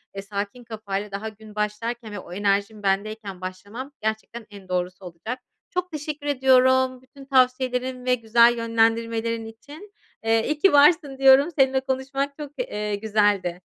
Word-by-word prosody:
eee, 195 - -4
sakin 200 +4 -5
kafayla, 210 -3 -5
daha 200 +3 -4
gün 215 0 -15
başlarken 215 +2 -3
ve 205 - -5
o 175 - -11
enerjim 205 +2 0
bendeyken 200 -1 -2
başlamam 200 +9 -7
gerçekten 220 +1 -4
en 200 -2 -13
doğrusu 180 +1 -3
olacak. 180 +9 -6 0.3
Çok 360 0 -3
teşekkür 300 -1 -5
ediyorum 260 -1 +3
bütün 270 +1 -15
tavsiyelerin 255 -1 +1
ve 250 0 +3
güzel 235 +1 +4
yönlendirmelerin 230 0 0
için. 290 - -12 0.3
Eee, 225 0 +2
iyi 300 0 -2
ki 385 0 +4
varsın 290 -1 +5
diyorum, 270 +3 +6
seninle 265 0 +4
konuşmak 270 +2 -3
çok, 295 -2 -7
eee, 210 -4 -2
güzeldi. 205 -4 +1
230 Hz, 150 wpm, -24 LUFS, 205-265 Hz, 0.3 s, diyorum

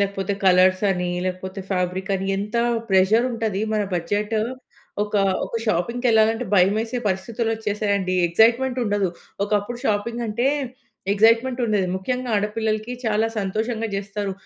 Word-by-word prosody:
లేకపోతే 200 0 -1
కలర్సని 185 0 +3 0.2
లేకపోతే 185 +1 -4
ఫ్యాబ్రికని 190 +1 -1
ఎంత 210 +4 -3 0.3
ప్రెషరుంటది. 220 +2 +2
మన 215 -1 +1
బడ్జెట్ 205 +6 -1 0.7
ఒక, 210 - -9 0.3
ఒక - - -11
షాపింగ్‌కెళ్ళాలంటే 225 +3 +2
భయమేసే 215 +6 +2
పరిస్థితులొచ్చేసాయండి. 205 -1 -1
ఎక్సైట్‌మెంటుండదు. 225 0 +2 0.4
ఒకప్పుడు 205 +3 -1
షాపింగంటే 235 +2 -1 0.7
ఎక్సైట్‌మెంటుండేది. 230 -1 +3
ముఖ్యంగా 250 +5 -3
ఆడపిల్లలకి 215 +2 -1
చాలా 220 0 +2
సంతోషంగా 220 +3 -2
జేస్తారు. 200 0 -3
210 Hz, 90 wpm, -22 LUFS, 195-225 Hz, 0.7 s, కలర్సని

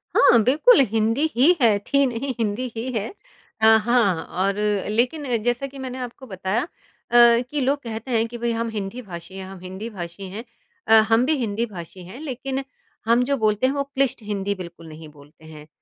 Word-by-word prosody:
हाँ, - - +6
बिल्कुल, 315 - +5
हिंदी 225 +6 +1
ही 285 +9 +5
है, 220 -4 +5
थी 280 +7 +1
नहीं 255 +2 -3
हिंदी 230 +3 -2
ही 235 +3 -4
है। 220 -2 -2 0.5
अ, - - +4
हाँ 220 -5 +4 0.2
और 200 0 +1 0.3
लेकिन 245 +3 0
जैसा 245 +3 -1
कि 275 0 -13
मैंने 260 -1 -6
आपको 250 +1 -7
बताया 190 +2 -2
अ, - - -7 0.8
कि 295 - -1
लोग 275 +2 +1
कहते 230 +2 -6
हैं 225 -1 +2
कि 240 +1 -8
भई 235 0 -1
हम 230 0 -2
हिंदी 210 +2 -5
भाषी 185 -2 -9
हैं, 190 - -6
हम 190 0 -10
हिंदी 190 +5 -7
भाषी 175 -3 -8
हैं, 210 +5 -7 0.4
अ, 220 - +4 0.2
हम 230 +2 +4
भी 310 +3 +2
हिंदी 230 -2 -1
भाषी 185 -3 -10
हैं 190 +9 -10
लेकिन 270 -1 -4 0.4
हम 235 +2 +3
जो 280 +2 0
बोलते 215 +1 +2
हैं 265 - 0
वो 280 -1 -1
क्लिष्ट 275 -3 -1
हिंदी 200 -1 -2
बिल्कुल 170 -1 -10
नहीं 155 0 -11
बोलते 145 +2 -18
हैं, 155 -1 -12
230 Hz, 195 wpm, -23 LUFS, 195-255 Hz, 0.8 s, हाँ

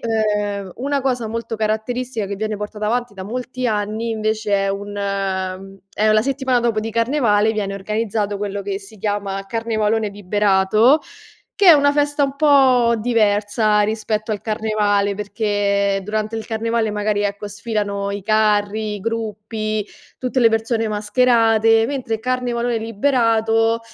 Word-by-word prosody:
ehm, 210 -4 -1
una 280 +3 -1
cosa 250 -4 -1
molto 230 0 -4
caratteristica 220 +1 -2
che 200 - -4
viene 215 +1 -3
portata 210 +1 -5
avanti 240 -1 -1
da 190 - -7
molti 250 +4 -3
anni, 215 +2 -2
invece, 215 -2 0
è - - 0
un 200 +1 -4 1.0
è 215 +1 +2
la 215 0 +4
settimana 260 -1 0
dopo 230 -2 0
di 225 +1 -4
carnevale, 230 -3 +2
viene 200 -2 -2
organizzato 210 0 -2
quello 200 0 -4
che 200 0 -4
si 205 +2 -14
chiama 200 -1 -2
carnevalone 220 -1 0
liberato, 205 - +3 0.6
che 400 -3 +4
è - - +12
una 285 -1 +4
festa 290 0 +1
un 275 0 -1
po' 260 -5 +4
diversa 210 -1 +2
rispetto 215 0 -2
al 205 - -6
carnevale, 210 -2 0
perché 200 -1 0
durante 215 +2 -3
il 220 - -5
carnevale 225 -1 -1
magari, 210 0 0
ecco, 205 +1 -3
sfilano 200 -1 -3
i 200 0 -4
carri, 215 0 +1
i - - -7
gruppi, 215 -1 -3 0.3
tutte 255 0 -1
le 230 - +6
persone 225 0 0
mascherate, 225 +1 +3
mentre 255 -5 -2
il - - -9
carnevalone 245 -1 -1
liberato 225 -1 +1
215 Hz, 145 wpm, -20 LUFS, 205-230 Hz, 1.0 s, è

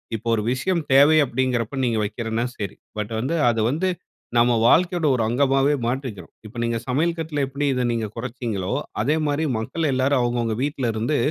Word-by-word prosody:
இப்ப 110 - -7
ஒரு 105 - -2
விஷயம் 170 +7 0
தேவை 145 +4 +7
அப்பிடிங்கின்றப்ப 130 0 -1
நீங்க 115 -2 0
வைக்கிறன்னா 115 +2 -2
சரி. 100 -3 -4 0.2
பட் 105 +1 -4
வந்து, 130 +8 -1 0.2
அத 115 - 0
வந்து, 175 +6 0 0.5
நம்ம 120 +1 +5 0.2
வாழ்க்கையோட 175 +3 +3
ஒரு 120 - 0
அங்கமாவே 135 +3 +2
மாற்றிக்கிறோம். 120 -7 -4
இப்ப 110 +3 -11
நீங்க 115 0 0
சமையல் 160 +7 0
கட்ல 160 -3 -2
எப்பிடி 140 +2 -3
இத 125 -1 0
நீங்க 115 -1 -1
குறச்சீங்களோ, 115 -5 -3 0.3
அதேமாரி 155 0 0
மக்கள் 145 +7 -2
எல்லாரும் 130 +1 +2
அவுங்க, 120 0 0
அவுங்க 115 -1 -1
வீட்ல 140 -3 -1
இருந்து 115 +7 0
130 Hz, 170 wpm, -23 LUFS, 115-145 Hz, 0.5 s, தேவை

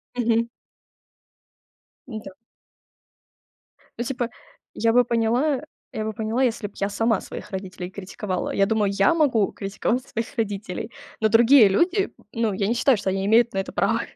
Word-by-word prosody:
Мгм. 230 -1 +1 1.6
Н-да. 220 -4 -7 1.7
Ну, 235 - -1
типа, 245 -1 -2 0.5
я 225 0 +2
бы 245 +1 +6
поняла 240 +5 +1 0.3
я 215 - -3
бы 220 - -2
поняла, 225 +4 -1
если 230 -4 0
б 200 - -17
я 200 - -1
сама 225 0 +1
своих - - -9
родителей 185 -2 -6
критиковала. 190 0 -4
Я 195 - +3
думаю, 210 -1 +1
я 195 +8 +3
могу 255 -11 +2
критиковать 210 +5 -2
своих 230 +3 -5
родителей. 205 0 -3 0.3
Но 220 - +3
другие 230 0 +7
люди, 355 - +1 0.2
ну, 230 -2 0
я 195 +1 -1
не 230 - +1
считаю, 245 +1 +3
что 195 - -2
они 190 +1 -1
имеют 230 +3 +4
на 195 - -1
это 195 - -4
право. - - +1
225 Hz, 155 wpm, -24 LUFS, 200-240 Hz, 1.7 s, другие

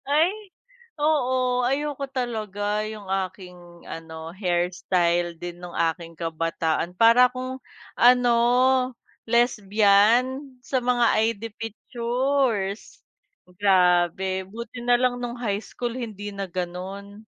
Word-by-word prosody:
Ay, 310 +5 +4 0.7
oo. 255 -4 +1
Ayoko 280 +1 -1
talaga 215 -4 -2
'yung 210 -2 -8
aking 185 -1 -4 0.3
ano, 160 0 -8
hairstyle 175 -2 0
din 175 +1 -8
nang 175 -1 -9
aking 165 0 -1
kabataan 165 +1 -2
para 230 +3 +6
akong 255 +1 -6 0.4
ano, 245 0 +5 0.9
lesbian 235 +4 +3
sa 260 -2 0
mga 245 -1 +2 0.3
ID 220 -1 -9 0.2
pictures, 235 -1 -2 0.6
grabe 185 -1 +2
buti 235 +4 -8
nalang 245 0 +2
nung 245 0 -4
high 210 -3 -2
school 240 -1 -5
hindi 205 -4 -6
na 195 -1 -4
ganon. 185 +3 -6
210 Hz, 100 wpm, -24 LUFS, 180-245 Hz, 0.9 s, para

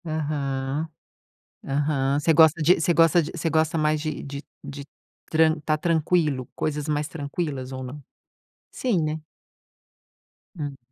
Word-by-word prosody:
Aham, 145 -1 -2 0.8
aham. 140 -1 +1
Você 160 +2 +3
gosta 160 +1 +6
de 165 +4 +5
você 170 +2 +2
gosta 165 +2 +5
de 150 - -5
você 165 0 -1
gosta, 160 0 +1
mais 155 0 +2
de 155 -1 -4
de 140 0 -6 0.2
de 140 -1 -7 0.5
tran 160 0 +4
estar 155 +1 0
tranquilo, 155 -5 +1
coisas 150 -1 -2
mais 150 -1 0
tranquilas 145 -3 -4
ou 130 0 -5
não? 135 +4 -8 0.7
Sim, 225 -10 0
né? 155 +1 -2 1.4
Hum. 145 -3 -4
150 Hz, 135 wpm, -25 LUFS, 140-160 Hz, 1.4 s, gosta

